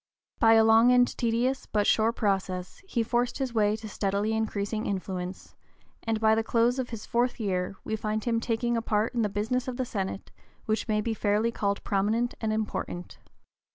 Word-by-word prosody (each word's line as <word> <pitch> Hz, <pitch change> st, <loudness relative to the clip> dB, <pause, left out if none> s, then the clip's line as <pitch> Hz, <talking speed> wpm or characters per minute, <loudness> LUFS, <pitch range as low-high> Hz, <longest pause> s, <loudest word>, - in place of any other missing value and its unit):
By 225 Hz, -1 st, +6 dB
a 225 Hz, 0 st, +6 dB
long 225 Hz, +2 st, +6 dB
and 245 Hz, 0 st, +5 dB
tedious 240 Hz, +3 st, 0 dB
but 210 Hz, -1 st, +1 dB
sure 220 Hz, +1 st, +3 dB
process 190 Hz, -5 st, -2 dB
he 240 Hz, -11 st, 0 dB
forced 240 Hz, +2 st, 0 dB
his 265 Hz, -3 st, -2 dB
way 210 Hz, -2 st, +2 dB
to 220 Hz, 0 st, -8 dB
steadily 205 Hz, +1 st, -1 dB
increasing 215 Hz, -1 st, -2 dB
influence, 185 Hz, -1 st, -4 dB, 0.5 s
and 225 Hz, -1 st, -1 dB
by 220 Hz, 0 st, +4 dB
the 225 Hz, 0 st, +1 dB
close 235 Hz, +3 st, +2 dB
of 255 Hz, -, -2 dB
his 225 Hz, -3 st, -7 dB
fourth 245 Hz, +1 st, 0 dB
year 190 Hz, -3 st, -1 dB
we 220 Hz, -, -2 dB
find 215 Hz, 0 st, -2 dB
him 230 Hz, -1 st, +1 dB
taking 235 Hz, +1 st, -1 dB
a 230 Hz, -, 0 dB
part 220 Hz, +1 st, 0 dB
in 240 Hz, -, 0 dB
the 210 Hz, -, +1 dB
business 220 Hz, +6 st, -1 dB
of 250 Hz, -1 st, -4 dB
the 255 Hz, -, -1 dB
Senate 195 Hz, -4 st, -4 dB, 0.3 s
which 215 Hz, +2 st, -1 dB
may 210 Hz, -1 st, +1 dB
be 225 Hz, +1 st, -1 dB
fairly 215 Hz, +2 st, +1 dB
called 200 Hz, -3 st, -1 dB
prominent 215 Hz, +5 st, 0 dB
and 220 Hz, -1 st, 0 dB
important. 210 Hz, -4 st, -4 dB
220 Hz, 190 wpm, -28 LUFS, 205-235 Hz, 0.5 s, By